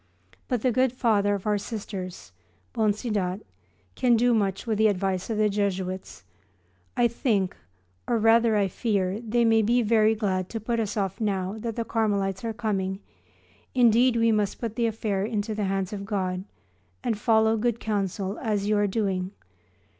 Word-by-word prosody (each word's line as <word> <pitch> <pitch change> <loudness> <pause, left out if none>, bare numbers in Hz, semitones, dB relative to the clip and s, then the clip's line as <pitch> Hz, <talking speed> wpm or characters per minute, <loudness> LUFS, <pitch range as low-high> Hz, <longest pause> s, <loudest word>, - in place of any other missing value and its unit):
But 245 -4 -1
the 255 - +3
good 255 +1 +2
Father 210 -5 +2
of 195 - -7
our 210 -1 +1
Sisters 195 - -6 0.4
(Bonsidat) 210 -3 0 0.5
can 245 - +3
do 245 +1 +3
much 200 -4 0
with 220 -3 -1
the 220 - +5
advice 190 -1 -1
of 220 - -1
the 215 0 +3
Jesuits. 190 - -3 0.7
I 240 - +5
think, 220 -5 0 0.5
or 235 - +2
rather 225 0 +4
I 200 -2 +2
fear, 195 -1 -1
they 235 +1 +1
may 225 -1 +4
be 235 +3 +2
very 220 0 +3
glad 190 -4 -1
to 225 - -4
put 230 +2 -2
us 215 -1 -2
off 195 +2 -2
now 195 -2 -1
that 230 0 -4
the 230 - -2
Carmelites 200 -3 0
are 230 - -1
coming. 195 -4 -2 0.8
Indeed, 240 0 +5
we 230 0 +3
must 210 -2 0
put 225 -2 -4
the 235 0 +1
affair 210 -3 -1
into 215 0 -2
the 210 -1 -2
hands 195 0 -1
of 200 -1 -5
God 185 -3 -2 0.6
and 230 - 0
follow 220 +1 +3
good 235 +1 0
counsel 200 -1 -2
as 205 -3 -1
you 210 0 +2
are 205 0 +2
doing. 190 -3 -1
215 Hz, 170 wpm, -26 LUFS, 195-230 Hz, 0.8 s, the